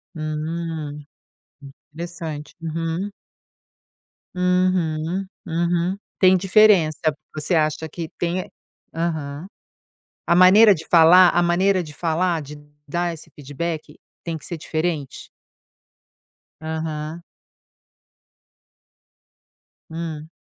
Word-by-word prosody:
Hum, 155 -1 -4 0.9
interessante. 160 -3 -7
Uhum. 165 +4 -3 1.3
Uhum, 180 -1 0 0.2
uhum, 175 +2 0 0.2
tem 185 0 +6
diferença, 190 -4 +4 0.4
você 155 +4 -2
acha 155 0 +1
que 160 +1 -7
tem 175 +1 -1
e 185 - -7 0.4
Aham. 160 -1 -3 0.8
A 170 - +3
maneira 200 +4 +8
de 165 -3 -7
falar 175 +2 +7
a 175 - +2
maneira 185 +2 +2
de 150 -2 -11
falar, 165 +2 0
de 145 +1 -9 0.3
dar 170 +3 -1
esse 160 0 -12
feedback 155 +3 -5 0.2
tem 165 -1 -3
que - - -13
ser 170 - -5
diferente? 155 -3 -3 1.3
Aham. 160 +1 -4 2.7
Hum. 160 -1 -6
165 Hz, 90 wpm, -22 LUFS, 155-175 Hz, 2.7 s, maneira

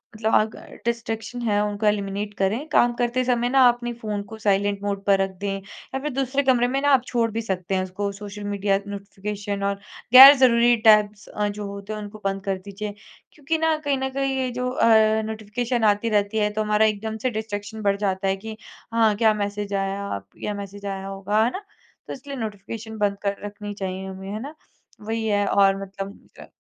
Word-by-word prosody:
मतलब 220 0 -1
अगर 215 0 -1
डिस्ट्रैक्शन 230 0 -3
है, 210 -3 +1
उनको 210 +1 -3
एलिमिनेट 205 0 -1
करें। 215 +10 0
काम 240 -5 +4
करते 245 +1 +1
समय 245 -1 +1
ना 260 -1 +6
अपने 240 0 -2
फ़ोन 215 -3 -4
को 220 - -8
साइलेंट 205 -1 +1
मोड 200 -1 -2
पर 195 -1 +4
रख 195 - 0
दें 200 -1 -2
या 200 +6 -8
फिर 300 - -2
दूसरे 270 +1 0
कमरे 245 -2 +3
में 270 +2 0
ना 285 - +2
आप 255 -3 +4
छोड़ 235 -2 +1
भी 225 - -2
सकते 190 -3 -2
हैं 185 - +1
उसको। 195 +2 -3
सोशल 205 +1 -8
मीडिया, 200 -1 0
नोटिफ़िकेशन 200 0 -5
और 200 0 +1 0.4
गैर 270 +2 +13
ज़रूरी 240 -2 +5
टैब्स 210 -1 +4
अ, 210 0 -2
जो 205 0 -5
होते 200 +1 -7
हैं, 215 - -5
उनको 210 +1 -9
बंद 195 0 -1
कर 195 -1 0
दीज़िए। 205 +1 -6 0.4
क्योंकि 305 +2 -2
ना 320 0 +2
कहीं 285 -3 -1
न 265 0 -2
कहीं 270 0 -1
ये 260 -1 0
जो 250 0 0
अ, 220 -3 +4
नोटिफ़िकेशन 220 +3 -3
आती 210 +2 +3
रहती 205 0 +1
है, 210 -1 +2
तो 215 - -1
हमारा 210 +1 +3
एकदम 220 +1 -2
से - - +4
डिस्ट्रैक्शन 215 -1 -5
बढ़ 200 -1 +1
जाता 195 -1 -1
है 190 - +2
कि 215 +2 -8 0.4
हाँ, 225 -2 +3
क्या 220 +1 +4
मैसेज 205 -1 -3
आया 195 - -2 0.2
या 210 - -2
मैसेज 200 0 -8
आया 195 -1 -4
होगा, 195 +2 0
है 235 - +1
ना? 390 +7 -6 0.4
तो - - -5
इसलिए 275 +1 -8
नोटिफिकेशन 220 0 -6
बंद 205 -1 0
कर 200 0 0
रखनी 205 0 -7
चाहिए 190 -1 -5
हमें, 190 0 -8
है 210 - -4
ना? 295 +4 -8 0.5
वही 225 +1 -3
है 205 -1 +2
और 195 0 +3
मतलब 195 0 -7 0.2
अ - - -11
210 Hz, 205 wpm, -23 LUFS, 200-235 Hz, 0.5 s, गैर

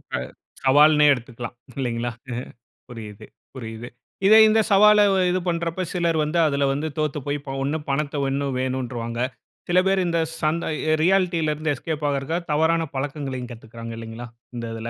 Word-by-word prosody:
அ - - +1
இப்ப - - -11 0.3
சவால்னே 150 +2 +6
எடுத்துக்கலாம். 120 -1 -7 0.2
இல்லங்களா? 120 -1 -2 0.2
அ - - -3 0.5
புரியுது, 110 -4 -9 0.3
புரியுது. 115 -2 -7 0.4
இத 215 - +8
இந்த 220 +1 +4
சவால 210 +1 +7 0.3
இது 185 - +1
பண்றப்ப 170 +1 -1
சிலர் 170 -2 +1
வந்து 155 +3 -1
அதில 140 -1 +1
வந்து 150 +3 -2
தோத்து 150 -1 -1
போய் 145 +1 0 0.3
ஒண்ணு 145 +3 -1
பணத்த 145 +1 -1
ஒண்ணும் 135 -1 -1
வேணும்னுட்ருவாங்க. 125 -3 -3 0.5
சில 180 +1 +5
பேர் 190 -1 +2
இந்த 170 -1 +1 0.2
சன் 155 +1 +1 0.4
ரியாலிட்டில 175 -4 +2
இருந்து 155 0 -2
எஸ்கேப் 150 +2 -4
ஆகுறதுக்கா 140 +4 -1
தவறான 165 +2 +2
பழக்கங்களையும் 135 -3 -4
கத்துக்கிறாங்க 115 0 -9
இல்லங்களா? 115 +1 -7 0.3
இந்த 115 - -4
இதில. 115 +1 -5
145 Hz, 150 wpm, -23 LUFS, 120-165 Hz, 0.5 s, இத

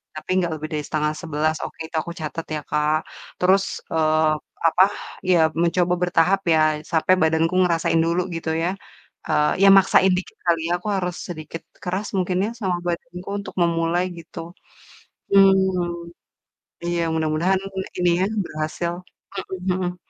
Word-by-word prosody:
tapi 155 - -9
nggak 175 -3 +1
lebih 155 0 -5
dari 150 -1 -2
10:30, 155 0 -1
oke, - - -10
itu 160 - -11
aku 170 - -7
catat 160 +2 -4
ya, 150 - -3
Kak. 150 +1 +2 0.5
Terus, 190 +2 +4 0.3
eee, 155 0 +3 0.4
apa, 185 - +5 0.5
ya 180 - +5 0.2
mencoba 175 +1 +2
bertahap 180 +2 +3
ya, 160 - +4 0.3
sampai 165 +3 +3
badanku 160 +2 +2
ngerasain 165 -1 +1
dulu 170 +2 +1
gitu 165 -1 -4
ya, 175 - +1 0.6
eee, 150 0 +2
ya - - +8
maksain 190 0 +5
dikit 180 - -6
kali 170 -1 +3
ya, - - -1
aku 180 - -9
harus 180 -2 -2
sedikit 155 0 -7 0.2
keras 185 +3 -2
mungkin 180 0 0
ya - - -2
sama 185 -4 0
badanku 175 +1 -5
untuk 200 - -8
memulai 170 +1 +1 0.2
gitu. 165 - -10 0.9
Mmm, 185 -3 +3 0.7
iya 175 0 -1
mudah-mudahan 160 +4 +1 0.4
ini 175 -1 +3
ya, 190 - +2 0.2
berhasil, 155 +3 -3 0.7
mhm 185 - +2
mhm. 180 -1 -2
170 Hz, 145 wpm, -22 LUFS, 160-180 Hz, 0.9 s, ya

